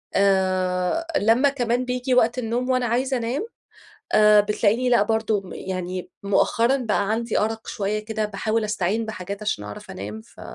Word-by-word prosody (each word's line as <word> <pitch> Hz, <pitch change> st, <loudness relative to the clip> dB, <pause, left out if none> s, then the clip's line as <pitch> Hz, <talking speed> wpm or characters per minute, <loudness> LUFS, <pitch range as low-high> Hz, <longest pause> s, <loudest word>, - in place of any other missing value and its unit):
آآ، 185 Hz, -, +1 dB
لمّا 235 Hz, +7 st, +4 dB
كمان 245 Hz, -2 st, -1 dB
بييجي 250 Hz, +1 st, -1 dB
وقت 245 Hz, 0 st, +3 dB
النوم 245 Hz, +2 st, -2 dB
وأنا 255 Hz, -1 st, +2 dB
عايزة 255 Hz, +3 st, 0 dB
أنام 245 Hz, -, -2 dB, 0.7 s
آآ، 210 Hz, -1 st, +6 dB
بتلاقيني 215 Hz, +4 st, +1 dB
لأ 240 Hz, -4 st, +4 dB
برضو 220 Hz, -1 st, 0 dB
م 190 Hz, -, -11 dB
يعني 185 Hz, -1 st, -5 dB
مؤخرًا 230 Hz, +5 st, +2 dB
بقى 215 Hz, -5 st, -1 dB
عندي 230 Hz, +1 st, 0 dB
أرق 225 Hz, +1 st, -2 dB
شويّة 210 Hz, 0 st, -2 dB
كده 215 Hz, 0 st, -3 dB
باحاول 215 Hz, +2 st, -1 dB
أستعين 210 Hz, +1 st, -1 dB
بحاجات 200 Hz, -1 st, -6 dB
عشان 210 Hz, -, -2 dB
أعرف 105 Hz, 0 st, -9 dB
أنام 105 Hz, +3 st, -7 dB
ف -, -, -18 dB
220 Hz, 160 wpm, -23 LUFS, 195-240 Hz, 0.7 s, آآ